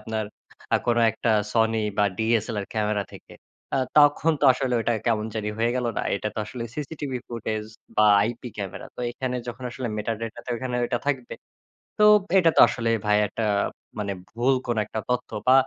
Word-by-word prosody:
আপনার 110 0 -3 0.5
আ - - +7
কোন 120 -1 +2
একটা 115 +1 -1 0.2
Sony 110 -1 +2 0.2
বা 105 - +5
DSLR 110 -2 0
ক্যামেরা 105 -1 0
থেকে। - - -13 0.4
আ - - +2 0.2
তখন 145 +2 +5
তো - - +2
আসলে 130 0 -2
ঐটা 120 +1 +1
কেমন 110 -2 +1
জানি 105 -1 -2
হয়ে 115 +1 +2
গেল 125 -1 -1
না? - - 0
এইটা 105 +1 -2
তো - - -5
আসলে 120 +1 -6
সিসিটিভি 145 -3 -4
ফুটেজ 110 -2 -3 0.3
বা 110 - +5 0.2
আইপি 120 +3 -3
ক্যামেরা। 100 -3 -6
তো - - -8
এখানে 125 +1 -3
যখন 125 +2 -7
আসলে 125 0 -4
মেটাডেটাতে 115 +2 -4
ওইখানে 125 +1 -4
ঐটা 120 0 -1
থাকবে। 130 -4 -1 0.7
তো 210 - +3 0.3
এটা 165 -3 +5
তো - - +7
আসলে 115 -2 -2 0.2
ভাইয়া 105 0 +4
একটা 115 - -3 0.6
মানে 100 -1 -2 0.2
ভুল 120 +5 +1
কোন 120 - 0
একটা 110 - -4
তথ্য 125 0 -1 0.2
বা 130 - +7
115 Hz, 180 wpm, -25 LUFS, 110-125 Hz, 0.7 s, আ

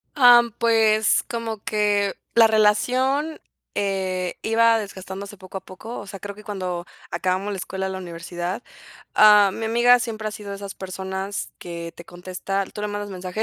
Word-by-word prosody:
Ah, 245 -3 +8 0.2
pues, 220 -2 +3
como 225 -3 -4
que 205 -2 +1 0.2
la 230 -1 +8
relación, 255 +8 +2 0.3
eh, 190 -2 -1
iba 230 0 +4
desgastándose 195 0 -7
poco 185 +1 -8
a - - -7
poco. 220 +6 -8
O - - -8
sea, 195 0 -8
creo 200 +1 -7
que 210 - -13
cuando 185 -4 -4 0.2
acabamos 185 +2 -1
la - - -4
escuela, 190 +1 -3
la 190 0 -4
universidad. 175 +3 -5 0.5
Ah, 210 -2 +7
mi 225 - -4
amiga 240 +2 +5
siempre 220 -3 -3
ha - - -5
sido 210 -1 -8
de 200 - -4
esas 200 0 -8
personas 190 +1 -4
que 170 -1 -7
te 170 - -10
contesta 185 +3 -4
tú 210 - -7
le 210 - -1
mandas 205 0 -4
mensaje 185 +3 -4
205 Hz, 170 wpm, -23 LUFS, 190-220 Hz, 0.5 s, Ah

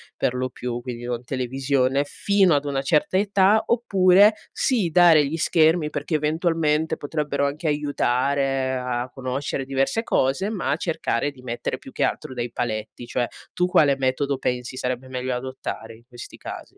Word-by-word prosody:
per - - 0
lo 130 0 -2
più, 125 - -12 0.2
quindi 120 -1 -7
non 120 0 -3
televisione, 130 +2 0
fino 195 +2 +2
ad 145 0 0
una 135 -1 -1
certa 150 +6 +1
età, 200 +1 +3
oppure 200 -3 +5 0.2
sì 220 -10 +1
dare 165 -3 +6
gli 155 +4 -3
schermi 160 -1 +3
perché 150 +2 -3
eventualmente 160 0 0
potrebbero 145 -1 -2
anche 150 +3 -3
aiutare 135 -2 0
a 125 0 -3
conoscere 135 +1 -3
diverse 135 - 0
cose, 135 +7 +1
ma 195 -9 -1
cercare 150 -5 -1
di 130 -2 -17
mettere 120 -1 -4
più - - -13
che - - -1
altro - - -2
dei 120 -2 -4
paletti. 110 -1 -4
Cioè, 125 - 0 0.3
tu 180 - +1
quale 145 -6 +4
metodo 135 +1 0
pensi 125 0 -3
sarebbe 130 0 -3
meglio 130 0 -3
adottare 125 -3 -6
in 115 - -20
questi 120 -1 -11
casi? - - -9
140 Hz, 160 wpm, -23 LUFS, 130-160 Hz, 0.3 s, dare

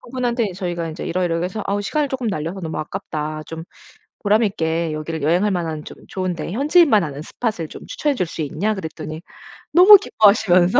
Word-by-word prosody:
그분한테 240 -4 -2
"저희가 175 -3 -3
이제 155 - -7
이러이러해서 180 +3 -1
아우 200 +1 -1
시간을 290 +7 0
쪼끔 255 -4 -2
날려서 165 +1 -3
너무 160 -3 -4
아깝다. 155 -3 -4
좀 165 0 -7 0.6
보람 215 +2 +3
있게 165 -4 -1
여기를 155 0 -4
여행할 175 +7 +2
만한 160 -4 -3
좀 - - -10
좋은데 180 -3 -3
현지인만 285 - +4
아는 145 -1 -6
스폿을 180 -4 -3
추천해 295 -2 -3
줄 180 - 0
수 160 -1 -5
있냐?" 175 +9 -1
그랬더니 160 -3 -7 0.5
너무 385 +4 +10
기뻐하시면서 200 - +4
180 Hz, 415 characters per minute, -21 LUFS, 160-215 Hz, 0.6 s, 너무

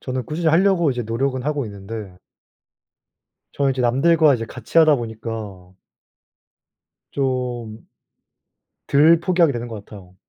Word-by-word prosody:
저는 130 -1 -4
꾸준히 160 +1 -1
하려고 170 -2 +3
이제 125 -1 -3
노력은 130 +3 -2
하고 145 -3 -2
있는데 100 -1 -8 1.4
저는 140 -1 0
이제 130 - -4
남들과 150 +5 +4
이제 115 -2 -3
같이 125 +7 -2
하다 155 -2 +6
보니까 110 -5 -7 1.4
좀 125 -5 -3 1.1
덜 155 +4 +5
포기하게 170 -4 +2
되는 120 -1 -5
것 110 -3 -8
같아요. 95 -4 -14
125 Hz, 270 characters per minute, -21 LUFS, 110-150 Hz, 1.4 s, 하다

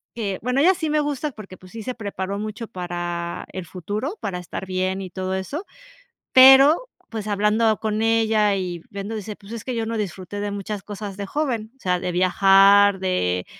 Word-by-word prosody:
que 200 -5 -3
bueno, 250 +2 +1
ella 365 +5 +6
sí 330 -4 -3
me 305 0 +2
gusta 295 0 -2
porque, 210 -6 -11
pues, 185 0 -16
sí 225 -1 -7
se 255 - -3
preparó 200 -2 -4
mucho 215 +2 -5
para 175 -3 -4
el 185 -2 -5
futuro, 205 - -4
para 190 -3 -4
estar 180 +2 -6
bien 185 +1 -2
y 185 -2 -7
todo 185 +1 -3
eso, 280 - -4 0.7
pero, 270 - +7 0.2
pues, 220 -2 -5
hablando 210 +2 +2
con 215 0 -1
ella 220 -2 +3
y 180 -3 -4
viendo, 200 +2 -5
dice: 210 0 -6
"Pues, 200 +1 -15
es 230 - -6
que 255 - -3
yo 225 -1 -1
no 230 0 -2
disfruté 195 -1 -5
de 205 0 -3
muchas 200 0 -5
cosas 205 -1 -7
de 200 - -4
joven, 235 -3 -2
o - - -37
sea, 180 -1 0
de 180 0 -3
viajar, 195 +2 +5
de 90 - 0
205 Hz, 200 wpm, -23 LUFS, 185-225 Hz, 0.7 s, pero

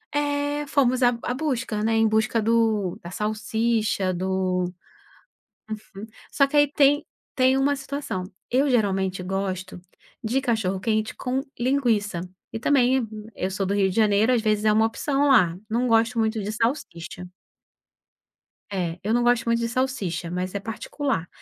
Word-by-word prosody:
eh, 290 0 0
fomos 255 -3 +2
a 245 - +7
a 245 - -1
busca, 255 -6 -2
né, 225 +1 +1
em 225 0 +4
busca 220 +1 +1
do 220 -4 +1
da 170 - -8
salsicha, 215 -1 0
do 185 0 -1 1.6
só 275 - +4
que 295 - -3
aí 290 0 +5
tem 290 +1 +4 0.3
tem 260 0 +4
uma 280 +1 +2
situação, 275 -8 -4 0.3
eu 270 +4 +3
geralmente 195 -5 +1
gosto 185 -1 -3 0.4
de 245 +5 +1
cachorro-quente 215 -2 0
com 255 +1 -1 0.2
linguiça, 235 -7 +1 0.3
e - - -3
também 255 -2 +3 0.3
eu 185 - -2
sou 195 +1 -2
do 195 - -1
Rio 195 -1 +3
de 185 - -6
Janeiro 215 +1 +3
às 240 -3 +2
vezes 215 -1 +1
é 215 - +5
uma 220 - +4
opção 280 +5 0
lá, 180 -11 +4
não 240 +3 +1
gosto 230 +1 +3
muito 220 -1 0
de 210 +2 -3
salsicha. 180 - -3 1.5
É, 175 -3 -2
eu 215 +3 0
não 240 - +2
gosto 240 -1 +3
muito 230 0 +2
de 230 0 -1
salsicha 230 -10 -2
mas 180 +2 -3
é - - 0
particular. 225 - -3
225 Hz, 155 wpm, -24 LUFS, 195-255 Hz, 1.6 s, a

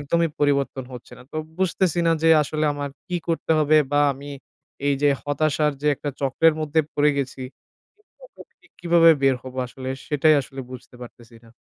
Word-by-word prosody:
একদমই 165 +3 0
পরিবর্তন 140 -2 0
হচ্ছে 125 -1 -11
না - - -13
তো - - -6 0.2
বুঝতেছি 185 -2 0
না - - +4
যে 165 - +4
আসলে 155 +1 -2
আমার 145 0 -4 0.2
কী 180 - -1
করতে 165 0 -2
হবে? 155 0 +3 0.2
বা 145 - +3
আমি, 140 +2 -10 0.6
এই 140 - +3
যে 145 - +5
হতাশার 150 +1 0
যে - - -2
একটা 145 +1 -5
চক্রের 145 +4 +3
মধ্যে 155 +1 +1
পড়ে 150 +1 +3
গেছি, 135 -1 -4 0.6
এটা - - -17
থেকে 365 - -28
কিভাবে 170 -1 +5
বের 135 -1 +3
হব? 130 -1 -10
আসলে 130 +1 -8 0.2
সেটাই 155 +1 +3
আসলে 135 0 -9
বুঝতে 130 -1 -11
পারতেছি 120 -1 -14
না। 115 - -18
145 Hz, 180 wpm, -23 LUFS, 135-160 Hz, 0.6 s, যে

